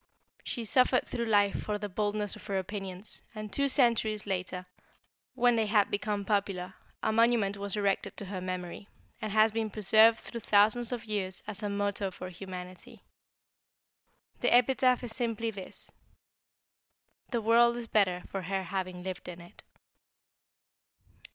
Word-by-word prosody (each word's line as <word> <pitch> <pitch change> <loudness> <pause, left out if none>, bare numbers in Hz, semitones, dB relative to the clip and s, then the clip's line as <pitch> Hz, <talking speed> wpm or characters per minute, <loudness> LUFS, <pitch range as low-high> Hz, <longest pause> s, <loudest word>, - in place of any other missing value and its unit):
She 235 - -3
suffered 255 +3 +3
through 235 -1 -3
life 205 -2 +3
for 210 -1 -2
the 205 0 -4
boldness 205 +1 -2
of - - -13
her 200 -2 -1
opinions, 190 0 -5
and 215 -1 -7
two 280 0 +2
centuries 230 -6 +2
after, 180 -1 -3 0.7
when 245 -1 +4
they 220 -1 +1
had 205 -1 +3
become 205 0 -1
popular, 195 -3 -1 0.3
a - - +2
monument 225 -3 +3
was 200 0 -4
erected 200 -1 0
to 205 - -6
her 185 -1 -5
memory, 185 +1 -5 0.3
and 215 - -3
has 215 +1 +5
been 220 0 -1
preserved 220 +2 +5
through 235 - -7
thousands 220 +3 +3
of 235 -2 -4
years 195 -3 -2
as 210 0 -4
a 205 - -2
motto 200 -1 -1
for 185 0 -8
humanity. 185 +4 -9 1.4
The - - +1
epitaph 250 +1 +4
is 230 -2 -5
simply 230 -2 -1
this: 195 -3 -9 1.4
'The 235 -3 -1
world 235 +2 +5
is 240 - -5
better 185 -5 +2
for 195 - -3
her 190 +1 -2
having 185 -1 -4
lived 185 -1 -6
in 175 -1 -7
it.'" 175 0 -14
205 Hz, 150 wpm, -30 LUFS, 190-225 Hz, 1.4 s, has